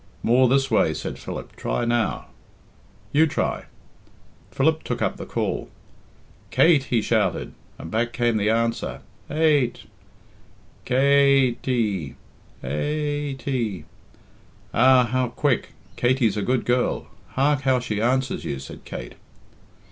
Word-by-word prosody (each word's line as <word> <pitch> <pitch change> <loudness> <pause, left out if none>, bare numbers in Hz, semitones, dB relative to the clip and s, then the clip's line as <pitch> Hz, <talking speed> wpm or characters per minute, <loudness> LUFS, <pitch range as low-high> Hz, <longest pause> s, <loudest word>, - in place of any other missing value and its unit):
"More 125 +2 +4
this 135 0 +2
way," 80 -7 +3
said - - -5
Philip. - - -7
"Try 120 - -2
now." 120 -3 0 0.9
"You 155 +3 +4
try." - - -2 0.8
Philip 160 +3 +1
took - - -4
up - - -1
the - - -8
call. - - -2 0.8
"Kate!" 155 -5 +4
he 115 -4 0
shouted, 105 -5 0 0.2
and 80 - -9
back 120 +2 0
came 120 -2 +1
the 105 0 +1
answer, 115 +1 -1 0.3
Ate! 150 -5 +2 1.0
"Kate 135 -1 +4
y!" 105 - -1 0.5
Ate 145 - -2
y. 115 - -2 0.9
"Ah! 130 +1 +6
how 125 +2 0
quick! 125 +2 -1 0.2
Katey's 120 -4 +2
a 105 - -1
good 125 +4 0
girl. 125 0 0 0.3
Hark 140 +1 +2
how 130 -1 +2
she 105 -4 -3
answers 130 +3 0
you," 70 - -3
said 70 +1 -10
Kate. - - -7
125 Hz, 125 wpm, -23 LUFS, 115-135 Hz, 1.0 s, Ah